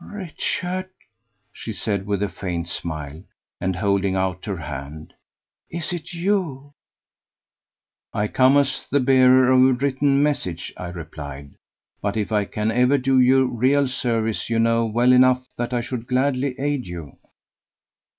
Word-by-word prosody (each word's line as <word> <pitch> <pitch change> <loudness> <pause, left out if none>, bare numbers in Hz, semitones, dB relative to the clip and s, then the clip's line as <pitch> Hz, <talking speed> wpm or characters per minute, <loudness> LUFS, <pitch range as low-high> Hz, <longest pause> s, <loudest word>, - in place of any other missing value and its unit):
"Richard," 185 -1 -4 0.6
she 115 - -7
said 100 -2 -3
with 100 -1 0
a - - +1
faint 90 -2 -4
smile, 80 -2 -5 0.4
and 95 0 -1
holding 100 +1 +1
out 95 -1 -2
her 100 -3 -3
hand, 75 0 -8 0.6
"is 170 +1 -4
it 170 -2 -6
you?" 170 -6 -2 1.4
"I 105 - -1
come 130 +5 +4
as 135 -2 0
the 145 - +2
bearer 130 -1 +5
of 130 0 +6
a 130 0 +5
written 140 +2 +1
message," 90 - -2
I 90 - -6
replied; 75 -5 -8 0.5
"but 100 +1 -2
if 105 0 -2
I 105 -2 +1
can 105 +2 -2
ever 125 +4 +3
do 130 0 +2
you 130 +1 +5
real 130 +3 +2
service 115 -7 -1
you 115 - 0
know 115 0 +2
well 120 +3 +3
enough 130 0 +4
that 120 +1 -3
I 120 -1 0
should 120 -1 -5
gladly 130 0 0
aid 140 -4 -1
you." 85 -6 -8
120 Hz, 150 wpm, -22 LUFS, 95-135 Hz, 1.4 s, of